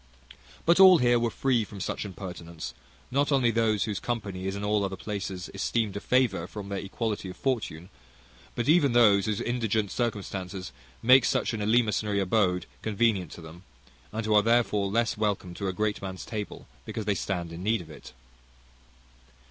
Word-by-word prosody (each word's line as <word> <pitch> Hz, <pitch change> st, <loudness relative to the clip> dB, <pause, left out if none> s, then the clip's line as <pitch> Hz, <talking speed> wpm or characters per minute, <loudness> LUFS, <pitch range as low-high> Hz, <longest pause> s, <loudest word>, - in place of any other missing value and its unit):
But 170 Hz, +2 st, +4 dB
all 190 Hz, -2 st, +9 dB
here 120 Hz, -3 st, +3 dB
were 115 Hz, 0 st, +1 dB
free 125 Hz, 0 st, +1 dB
from 105 Hz, -1 st, -10 dB
such 95 Hz, -, -3 dB
impertinence, 85 Hz, -8 st, -7 dB, 0.4 s
not 140 Hz, +3 st, +1 dB
only 130 Hz, -4 st, +3 dB
those 110 Hz, -3 st, +2 dB
whose 105 Hz, -3 st, -3 dB
company 100 Hz, -6 st, -4 dB
is 95 Hz, -, -2 dB
in 100 Hz, -, -5 dB
all 105 Hz, 0 st, +1 dB
other 95 Hz, -1 st, -2 dB
places 95 Hz, -3 st, -5 dB
esteemed 105 Hz, +1 st, -1 dB
a -, -, -2 dB
favour 125 Hz, -7 st, +1 dB
from 100 Hz, 0 st, -8 dB
their 100 Hz, -1 st, -2 dB
equality 105 Hz, 0 st, -3 dB
of 90 Hz, -, -9 dB
fortune, 105 Hz, -, -2 dB, 0.7 s
but 120 Hz, -, -2 dB
even 150 Hz, -5 st, +4 dB
those 105 Hz, -5 st, +5 dB
whose 105 Hz, -2 st, -1 dB
indigent 110 Hz, -4 st, -1 dB
circumstances 95 Hz, -5 st, -3 dB, 0.3 s
make 130 Hz, +2 st, +7 dB
such -, -, +1 dB
an 110 Hz, -, -3 dB
eleemosynary 105 Hz, -2 st, +2 dB
abode 90 Hz, -2 st, +1 dB, 0.2 s
convenient 105 Hz, -5 st, +1 dB
to -, -, -10 dB
them, 80 Hz, +2 st, -11 dB, 0.5 s
and 110 Hz, +1 st, -3 dB
who 110 Hz, -, +1 dB
are 105 Hz, -, +6 dB
therefore 110 Hz, -3 st, +2 dB
less 115 Hz, +1 st, 0 dB
welcome 100 Hz, -4 st, -1 dB
to 100 Hz, +2 st, -4 dB
a -, -, 0 dB
great 105 Hz, +2 st, -1 dB
man's 95 Hz, -1 st, -6 dB
table 105 Hz, -2 st, -6 dB, 0.2 s
because 110 Hz, -, -5 dB
they 105 Hz, -, +2 dB
stand 90 Hz, -4 st, -3 dB
in 85 Hz, -, -7 dB
need 110 Hz, +1 st, +1 dB
of 80 Hz, -2 st, -12 dB
it. 75 Hz, -, -12 dB
105 Hz, 180 wpm, -27 LUFS, 95-115 Hz, 0.7 s, all